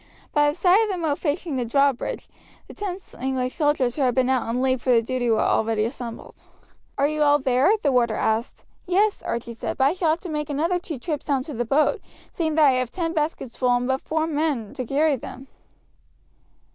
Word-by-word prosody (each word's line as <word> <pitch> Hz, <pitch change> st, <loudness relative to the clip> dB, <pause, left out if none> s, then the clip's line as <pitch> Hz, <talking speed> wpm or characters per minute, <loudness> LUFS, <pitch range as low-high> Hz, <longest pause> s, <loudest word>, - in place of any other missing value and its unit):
By 295 Hz, -1 st, +4 dB
the 295 Hz, -, -3 dB
side 365 Hz, +4 st, +4 dB
of 435 Hz, -, -2 dB
the 380 Hz, -, -2 dB
moat 315 Hz, -4 st, -1 dB
facing 305 Hz, -2 st, -2 dB
the 250 Hz, -, 0 dB
drawbridge 275 Hz, +2 st, 0 dB, 0.4 s
the -, -, -11 dB
ten 390 Hz, -3 st, -4 dB, 0.2 s
English 260 Hz, -1 st, -2 dB
soldiers 290 Hz, -6 st, +1 dB
who 295 Hz, -, -2 dB
had 250 Hz, -2 st, +2 dB
been 260 Hz, 0 st, +2 dB
out 260 Hz, -2 st, +2 dB
on 235 Hz, +2 st, -1 dB
leave 260 Hz, -1 st, +1 dB
for -, -, -4 dB
the 235 Hz, -2 st, +5 dB
day 245 Hz, 0 st, -1 dB
were 220 Hz, -, +3 dB
already 220 Hz, -1 st, +1 dB
assembled. 235 Hz, -1 st, -7 dB, 0.6 s
"Are 280 Hz, -, +3 dB
you 305 Hz, 0 st, -2 dB
all 290 Hz, 0 st, +5 dB
there?" 260 Hz, +1 st, +2 dB
the 285 Hz, -, +3 dB
warder 235 Hz, -3 st, +2 dB
asked. 220 Hz, +2 st, -1 dB, 0.2 s
"Yes," 400 Hz, +4 st, +2 dB
Archie 235 Hz, 0 st, -4 dB
said, 225 Hz, -, -5 dB
"but 265 Hz, -, +2 dB
I 275 Hz, +4 st, +4 dB
shall 355 Hz, -3 st, 0 dB
have 320 Hz, +2 st, +1 dB
to 360 Hz, -, -7 dB
make 300 Hz, -1 st, -3 dB
another 330 Hz, +5 st, 0 dB
two 330 Hz, -4 st, -6 dB
trips 295 Hz, +3 st, -4 dB
down 275 Hz, -3 st, +1 dB
to 295 Hz, -, -8 dB
the 240 Hz, 0 st, -2 dB
boat, 305 Hz, -, +2 dB, 0.3 s
seeing 315 Hz, -3 st, -1 dB
that 315 Hz, -1 st, +5 dB
I 275 Hz, -, +6 dB
have 255 Hz, -2 st, -2 dB
ten 330 Hz, +3 st, -3 dB
baskets 300 Hz, -6 st, -2 dB
full 250 Hz, -1 st, +2 dB
and 245 Hz, 0 st, 0 dB
but 265 Hz, 0 st, 0 dB
four 315 Hz, 0 st, -1 dB
men 295 Hz, -8 st, -1 dB
to 255 Hz, -, -4 dB
carry 290 Hz, +1 st, +2 dB
them." 260 Hz, +2 st, -9 dB
280 Hz, 220 wpm, -23 LUFS, 250-315 Hz, 0.6 s, I